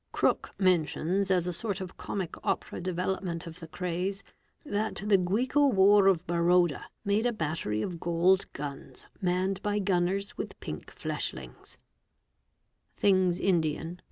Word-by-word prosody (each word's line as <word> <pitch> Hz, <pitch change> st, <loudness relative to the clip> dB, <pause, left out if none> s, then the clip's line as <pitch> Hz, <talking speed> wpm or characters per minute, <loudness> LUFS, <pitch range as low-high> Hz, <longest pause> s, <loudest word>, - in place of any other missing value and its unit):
Crooke -, -, +1 dB
mentions 185 Hz, +1 st, +1 dB
as 180 Hz, -2 st, +3 dB
a 180 Hz, -, -2 dB
sort 200 Hz, 0 st, -3 dB
of 185 Hz, -2 st, -7 dB
Comic 190 Hz, -5 st, -4 dB
Opera -, -, -2 dB
development 180 Hz, -1 st, -2 dB
of 165 Hz, 0 st, -9 dB
the 165 Hz, -2 st, -10 dB
raze 185 Hz, +2 st, -2 dB, 0.4 s
that 215 Hz, -4 st, -1 dB
"the 205 Hz, -2 st, +5 dB
Guicowar 205 Hz, -1 st, +4 dB
of 180 Hz, -2 st, +1 dB
Baroda 175 Hz, -2 st, +2 dB, 0.2 s
made 205 Hz, +4 st, +2 dB
a -, -, +1 dB
battery 155 Hz, -, -2 dB
of 175 Hz, -2 st, -4 dB
gold 175 Hz, +3 st, +2 dB
guns 140 Hz, -2 st, -7 dB, 0.2 s
manned 185 Hz, +1 st, 0 dB
y 205 Hz, 0 st, 0 dB
gunners 195 Hz, 0 st, 0 dB
with -, -, -6 dB
pink -, -, -7 dB
fleshings" -, -, -6 dB, 1.2 s
(Things 185 Hz, -3 st, +3 dB
Indian, 165 Hz, -2 st, 0 dB
p. -, -, -31 dB
185 Hz, 135 wpm, -29 LUFS, 170-195 Hz, 1.2 s, the